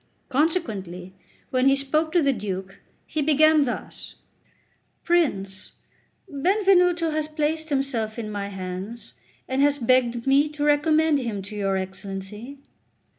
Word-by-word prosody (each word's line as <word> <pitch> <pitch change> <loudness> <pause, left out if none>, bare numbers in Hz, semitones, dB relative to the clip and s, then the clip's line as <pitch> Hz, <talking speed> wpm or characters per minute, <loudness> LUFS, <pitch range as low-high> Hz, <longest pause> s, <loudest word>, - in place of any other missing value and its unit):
Consequently, 215 - -1 0.4
when 255 0 +2
he 275 - +5
spoke 305 +4 0
to 345 -2 +3
the 275 -1 +3
Duke, 195 -3 -5 0.3
he 310 - -3
began 310 0 +4
thus: 245 - -6 0.9
"Prince, 200 - 0 0.5
Benvenuto 360 +1 +2
has 310 0 -1
placed 310 +1 -1
himself 260 -6 -1
in 215 -2 -5
my 200 -1 -3
hands, 190 - -6 0.3
and 260 +1 0
has 285 0 +3
begged 240 -2 +2
me 280 +2 +4
to 295 -1 -5
recommend 305 +1 +3
him 220 -6 -4
to 205 +2 -8
your 195 -2 0
Excellency." 195 +6 -6
270 Hz, 125 wpm, -24 LUFS, 205-310 Hz, 0.9 s, he